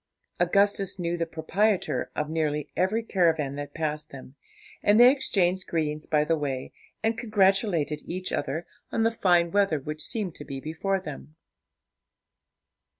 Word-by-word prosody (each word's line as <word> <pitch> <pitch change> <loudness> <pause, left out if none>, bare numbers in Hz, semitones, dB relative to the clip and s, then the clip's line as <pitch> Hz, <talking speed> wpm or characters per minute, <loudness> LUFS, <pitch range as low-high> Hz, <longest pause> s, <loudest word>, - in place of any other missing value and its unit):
Augustus 200 +2 +2
knew 170 -1 -1
the 165 -1 -2
proprietor 180 +6 0
of 150 - -1
nearly 150 -2 -1
every 215 +5 +1
caravan 165 -9 +1
that 145 0 -7
passed 155 -2 -3
them, 130 -1 -11 0.5
and 205 +2 +4
they 245 +1 +9
exchanged 190 -9 0
greetings 155 -2 -2
by 150 -1 +3
the 165 +2 +1
way, 135 -4 -4 0.3
and 225 0 0
congratulated 195 -8 +2
each 185 +1 -4
other 155 +6 -2 0.3
on 225 - +1
the 225 - +3
fine 175 -6 +3
weather 200 -6 +2
which 150 +3 -6
seemed 205 -7 -1
to 145 - -9
be 135 -2 -6
before 165 +7 -2
them. 155 -3 -9
170 Hz, 150 wpm, -27 LUFS, 150-195 Hz, 0.5 s, they